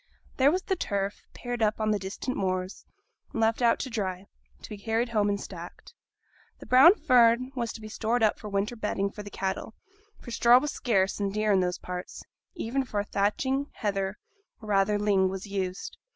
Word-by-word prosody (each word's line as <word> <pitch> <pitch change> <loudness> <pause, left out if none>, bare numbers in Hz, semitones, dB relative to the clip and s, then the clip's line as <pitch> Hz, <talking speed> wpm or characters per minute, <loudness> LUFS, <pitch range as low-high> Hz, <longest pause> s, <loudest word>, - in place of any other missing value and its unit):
There 270 +1 +5
was 370 +3 -1
the 380 - 0
turf, 200 - -3
pared 245 -1 -5
up 215 0 +1
on 215 0 +1
the 210 - +1
distant 195 +7 -4
moors, 185 0 -2 0.5
and - - -4
left 225 +2 +2
out 235 -1 +4
to 265 - -4
dry, 190 -4 -3 0.4
to - - -9
be 210 - -7
carried 225 +3 -1
home 210 -3 +1
and 200 0 0
stacked; - - -10 0.6
the - - -12
brown 270 +10 +7
fern 250 - +4
was 235 -3 -2
to 220 - -10
be 215 - -8
stored 225 +2 -1
up 215 - +2
for 210 - -7
winter 200 +4 -1
bedding 200 -3 -2
for 210 - -8
the 205 - -8
cattle; 195 +3 -4 0.4
for 240 - -10
straw 235 +1 +6
was 290 +3 0
scarce 195 -5 0
and 200 -1 -1
dear 215 0 +1
in 195 - +4
those 180 -1 0
parts; 180 0 -7 0.3
even 270 -4 -1
for 210 -5 -2
thatching, 260 +8 0
heather 195 -2 -2 0.4
(or 215 - -10
rather 200 +1 +3
ling) 200 -2 +2
was 190 +1 -5
used. 190 -2 -4
210 Hz, 195 wpm, -28 LUFS, 195-240 Hz, 0.6 s, brown